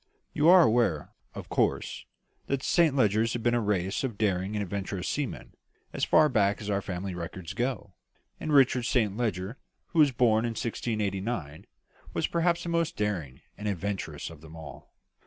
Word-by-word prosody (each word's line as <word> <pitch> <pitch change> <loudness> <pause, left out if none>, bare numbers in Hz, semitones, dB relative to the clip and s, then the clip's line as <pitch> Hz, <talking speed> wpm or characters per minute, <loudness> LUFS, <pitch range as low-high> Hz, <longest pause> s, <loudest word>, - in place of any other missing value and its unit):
"You 150 +3 +4
are 180 -1 +9
aware, 110 - +1 0.2
of - - -7
course, - - -1 0.4
that 140 -1 -1
the - - -6
Saint 165 -5 +3
Legers 110 -2 +2
have 120 - -3
been 120 - +2
a 120 - +2
race 95 -1 -1
of 120 -6 -3
daring 95 -1 0
and 105 - 0
adventurous 95 -1 -4
seamen, 145 -3 -4 0.4
as - - -3
far 155 0 +5
back 105 -6 +2
as 105 -1 -4
our 100 0 0
family 95 0 -4
records 85 +1 -6
go; 120 -3 -3 0.5
and 155 - -3
Richard 130 -4 +4
Saint 110 -6 +1
Leger, 105 -1 -2 0.3
who 165 - -1
was 145 -3 +6
born 115 -3 +3
in 120 -1 -1
1689, 105 -8 -3 0.5
was - - +1
perhaps 170 0 +1
the 170 - -4
most 170 -1 0
daring 90 -11 -2
and 105 - -5
adventurous 100 -2 -3
of 80 -2 -13
them 80 0 -12
all. 80 -5 -11
105 Hz, 175 wpm, -28 LUFS, 95-125 Hz, 0.5 s, are